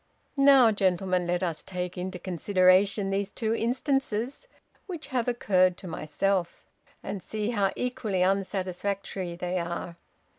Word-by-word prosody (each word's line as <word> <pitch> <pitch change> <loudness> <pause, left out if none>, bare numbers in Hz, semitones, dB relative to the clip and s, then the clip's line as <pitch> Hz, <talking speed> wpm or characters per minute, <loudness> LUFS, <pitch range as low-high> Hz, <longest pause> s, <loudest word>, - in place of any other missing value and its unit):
"Now, 275 -4 +7
gentlemen, 185 -2 +1
let 175 +1 0
us 165 -4 -2
take 180 -1 -5
into 180 +1 -4
consideration 185 +2 +2
these 195 0 -1
two 220 +1 -2
instances 260 - -1 0.4
which 345 -5 -5
have 245 -2 0
occurred 185 -7 +2
to 185 - -9
myself 175 +3 -2 0.4
and 195 -1 -5
see 215 +4 -3
how 200 -4 +1
equally 245 -7 -1
unsatisfactory 190 -1 -2
they 180 +1 -2
are. 170 0 -5
195 Hz, 125 wpm, -27 LUFS, 180-220 Hz, 0.4 s, Now